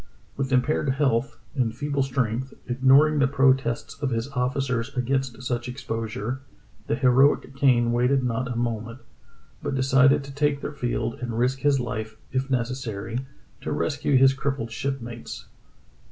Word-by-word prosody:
" - - -32
With 135 -1 -2
impaired 135 +3 +2
health, 130 -3 +1 0.2
in 125 -5 +1
feeble 145 +3 -2
strength, 130 -1 -1
ignoring 135 +4 +4
the 135 - +4
protests 135 -2 +1
of 140 - 0
his 115 +2 -2
officers 125 -2 -1
against 130 -1 -1
such 120 -1 -2
exposure, 115 0 -4 0.5
the - - +1
heroic 130 +1 +3
Kane 120 -4 +3
waited 125 +3 +2
not 125 +1 -1
a - - -3
moment, 115 0 -3 0.6
but - - -2
decided 135 +2 +4
to 140 0 -9
take 145 0 +1
the - - -4
field 120 -4 -2
and 120 -2 -3
risk 130 +3 +1
his 145 -1 +3
life, 110 -2 -4 0.2
if 130 +1 -1
necessary, 125 -1 -3 0.3
to - - -4
rescue 145 -2 +1
his 135 +1 +6
crippled 135 -4 -3
shipmates. 120 -2 -5
130 Hz, 150 wpm, -25 LUFS, 120-135 Hz, 0.6 s, his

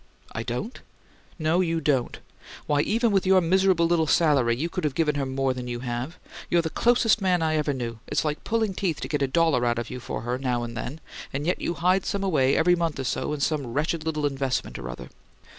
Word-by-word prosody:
"I 110 - -4
don't?" 125 - -4 0.6
"No; 160 +1 +1
you 165 -2 0
don't. 140 -5 0 0.5
Why, 145 -1 +2
even 230 +6 +1
with 195 -2 +2
your 190 0 +6
miserable 185 0 +3
little 165 -2 +2
salary 140 -8 +3
you 160 +6 -1
could 180 +1 -4
have 145 -3 -1
given 155 -3 +2
her 140 -2 -2
more 135 0 0
than 125 -1 -6
you 120 -1 -4
have. 125 +6 -4 0.3
You're 170 -1 +3
the 160 - -3
closest 235 -2 +3
man 180 -3 +2
I 155 0 +1
ever 150 -1 +1
knew: 120 -4 -4
it's - - 0
like 150 0 -2
pulling 220 -3 0
teeth 180 -5 -2
to - - -3
get 150 -2 -2
a 140 - +2
dollar 160 -3 +2
out 120 -1 +1
of 120 -1 -4
you 125 - -5
for 120 - -5
her, 120 +2 -2
now 125 -3 -1
and 115 0 -6
then, 125 +7 -5 0.3
and 140 +2 -3
yet 180 - 0
you 170 - -2
hide 185 +2 +2
some 200 -1 -1
away, 140 -8 +2
every 175 +2 +4
month 165 -4 -2
or - - -2
so, 130 - -2
in 150 -1 -3
some 145 -2 0
wretched 155 +2 0
little 155 -2 -1
investment 135 -3 -2
or - - -6
other. 60 0 -8
150 Hz, 235 wpm, -25 LUFS, 130-175 Hz, 0.6 s, your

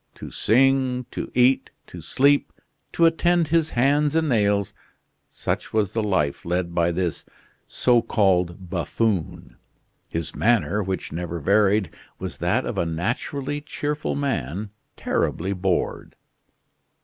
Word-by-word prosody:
To - - -9
sing, 130 +1 +2
to - - -5
eat, 125 +1 +3 0.2
to 90 - -10
sleep, 140 - +2 0.4
to 170 - +3
attend 170 +1 +3
to 150 - -13
his 165 -1 +3
hands 145 +4 +2
and 160 -1 +2
nails 100 -4 +1 0.6
such - - -4
was 105 -3 +1
the 115 - 0
life 95 -9 0
led 85 0 -2
by 85 0 +2
this 85 -1 -2 0.4
so 120 -2 +3
called 90 -4 0
buffoon. 95 0 -2 0.5
His 80 -1 -4
manner, 110 -2 +2
which 95 -1 -4
never 85 +1 -4
varied, 100 +2 +2 0.3
was - - -6
that - - +1
of - - -3
a 85 - +1
naturally 130 - -3
cheerful 150 0 -3
man 100 - -2 0.2
terribly 95 +4 -1
bored. 95 -1 -2
105 Hz, 130 wpm, -23 LUFS, 90-135 Hz, 0.6 s, eat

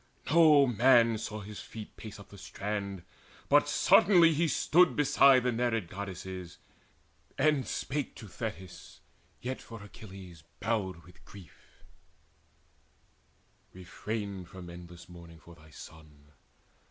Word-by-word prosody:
No 155 -3 +6
man 120 -2 +4
saw 110 -1 -6
his 105 +1 -9
feet 110 -2 -10
Pace 110 -2 -10
up 100 - -14
the 100 - -13
strand, 100 -1 -5 0.5
but - - +4
suddenly 170 -5 +5
he 165 +3 +1
stood 175 +4 +3
Beside 140 -3 +5
the 125 - +1
Nereid 115 -6 -1
Goddesses, 95 -2 -7 0.8
and 145 -2 +2
spake 140 +1 -4
To 110 - -11
Thetis, 95 -1 -8 0.4
yet 130 +1 -5
for 115 -3 -11
Achilles 95 -5 -12 0.2
bowed 95 -6 -2
with 90 -1 -19
grief: 95 -5 -17 1.9
"Refrain 100 +1 -6
from 90 0 -11
endless 85 0 -12
mourning 85 -2 -13
for 85 - -16
thy 80 -1 -18
son. 75 -1 -15
100 Hz, 120 wpm, -30 LUFS, 90-125 Hz, 1.9 s, No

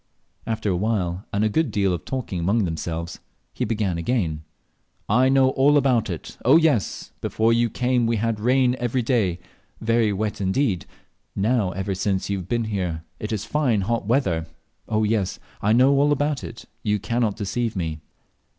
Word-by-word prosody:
After 110 -2 -1
a - - +2
little 90 - -1
while, 90 -4 -1
and 100 +1 0
a - - +4
good 160 +9 +1
deal 100 -3 +1
of 85 - -5
talking 125 -9 -3
among 100 +6 +2
themselves, 85 0 -4 0.3
he - - -2
began 105 -6 -1
again 85 -6 -1 0.7
"I 125 +5 +4
know 135 -1 +4
all 140 +3 +4
about 125 -6 +2
it 85 -4 -7
oh 135 +6 +7
yes! 155 -11 +1
Before 115 +1 +2
you 115 0 +2
came 125 0 +1
we 115 - +1
had 110 0 -1
rain 125 +2 +3
every 120 +1 0
day 110 -8 +1 0.4
very 115 -1 +2
wet 105 +1 -2
indeed; 95 -1 0 0.5
now, 105 0 +1
ever 95 +2 -2
since 95 +1 -1
you 100 - -1
have 90 - -9
been 120 -1 +1
here, 90 -7 -3 0.2
it 105 - -5
is 105 -3 -2
fine 130 -9 +1
hot 115 +1 -1
weather. 95 - +1 0.4
Oh, 110 -1 +1
yes! 105 -3 0 0.2
I 105 - +2
know 130 +4 +5
all 145 +1 +4
about 145 0 0
it; 115 - -9 0.2
you 105 -1 +1
can't 115 +1 -1
deceive 115 +2 -2
me." 80 -4 -3
110 Hz, 180 wpm, -23 LUFS, 95-125 Hz, 0.7 s, oh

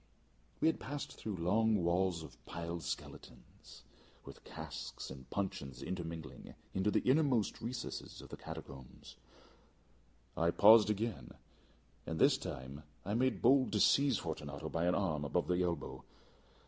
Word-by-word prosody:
We - - +4
had 160 - +2
passed 145 0 -5
through 105 -3 -5
walls 90 -2 +2
of 65 -6 -13
piled 85 0 -4 0.2
bones, - - -14 0.4
with - - -11
casks - - -7
and 65 -1 -10
puncheons 95 -9 -3
intermingling, 85 -3 -6 0.2
into 95 +2 +1
the - - +1
inmost 130 -5 +3
recesses 120 +2 -5
of - - -8
catacombs. 65 -2 -10 1.2
I 85 +1 +2
paused 105 +4 +7
again, 105 - -2 0.7
and 80 - -2
this - - +5
time 65 +3 -6 0.2
I 100 - -2
made 130 +3 +1
bold 130 +2 +5
to - - +2
seize 140 -5 +5
Fortunato 75 -2 -5
by 85 +2 0
an 90 - +3
arm 80 -7 0
above 85 +5 0
the 90 0 +2
elbow. 85 -1 -2
90 Hz, 135 wpm, -35 LUFS, 80-110 Hz, 1.2 s, paused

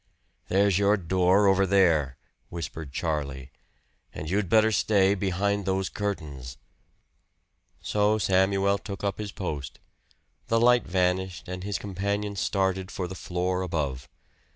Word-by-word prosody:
"There's 100 0 +3
your 100 +1 +3
door 95 +2 +2
over 95 0 +4
there," 85 -9 +3 0.3
whispered 80 -3 -6
Charlie. 70 -3 -3 0.6
"And 75 - -6
you'd 100 -2 0
better 110 0 +4
stay 100 -2 +3
behind 100 +1 -1
those 95 0 0
curtains." 75 -11 -5 1.2
So 105 +1 +1
Samuel 100 0 +2
took 100 -1 -8
up 100 0 -2
his 105 -1 -4
post; 75 -10 -5 0.7
the 115 - +2
light 120 -1 +4
vanished 90 -1 -1
and 90 0 -6
his 100 0 -2
companion 100 +1 -3
started 95 -1 -1
for 90 -3 -4
the 95 - -7
floor 90 0 -2
above. 70 -8 -3
95 Hz, 130 wpm, -26 LUFS, 85-100 Hz, 1.2 s, over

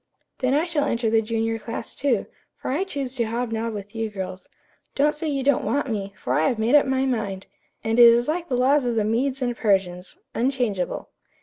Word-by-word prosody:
"Then 260 0 +2
I 310 +3 +2
shall 315 -4 0
enter 235 -4 0
the 225 0 +4
junior 225 0 -1
class, 230 +1 -6
too, 275 -3 0 0.3
for - - -4
I 325 +9 0
choose 275 -8 -4
to 235 - +1
hob 235 +1 -2
nob 225 0 -2
with 205 +1 -8
you 225 -1 -2
girls. 190 -2 -7 0.5
Don't 295 +2 +3
say 315 +2 -4
you 275 -3 -1
don't 280 -1 +2
want 280 -3 0
me, 200 -2 -3
for - - -2
I 155 - +3
have 240 - 0
made 225 +4 +1
up 295 -2 +6
my 265 0 +1
mind; 210 -7 -2 0.4
and 225 +2 +1
it 235 -1 +10
is 240 +1 +2
like 340 +2 -2
the 250 - +1
laws 275 +3 +3
of 240 -1 -1
the 220 - +2
Medes 255 +4 0
and 245 -1 -1
Persians, 190 -4 0 0.2
unchangeable." 240 -7 -1
235 Hz, 220 wpm, -24 LUFS, 220-270 Hz, 0.5 s, it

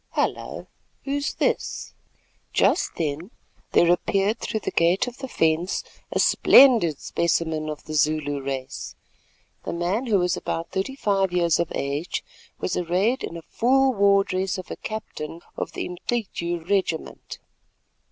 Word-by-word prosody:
Hullo! - - -2 0.4
who's 285 +1 -2
this?" - - -1 0.6
Just - - +2
then 160 +3 -3 0.4
there 170 0 +5
appeared 195 +5 +1
through 220 - -3
the - - -3
gate 170 +3 +3
of 245 0 -8
the 265 - -5
fence 165 -3 +1 0.3
a - - -1
splendid 230 - +6
specimen 160 -2 0
of 150 0 -6
the 155 - -7
Zulu 150 -2 +1
race. 135 -1 -5 0.7
The - - -4
man, 180 +9 -1
who 215 -3 +3
was 180 -1 +1
about 165 0 -4
thirty 195 +8 -2
five 195 -7 +1
years 170 -2 +2
of 170 - -1
age, 140 +5 -2 0.4
was 180 - -2
arrayed 185 +9 +1
in 170 - -5
a 165 - -9
full 265 +6 +2
war 200 -2 +4
dress 190 0 -2
of 185 - -8
a - - -3
captain 170 -7 -6
of - - -4
the - - -3
Umcityu 175 -3 -3
regiment. 190 -5 -2
180 Hz, 145 wpm, -24 LUFS, 160-205 Hz, 0.7 s, splendid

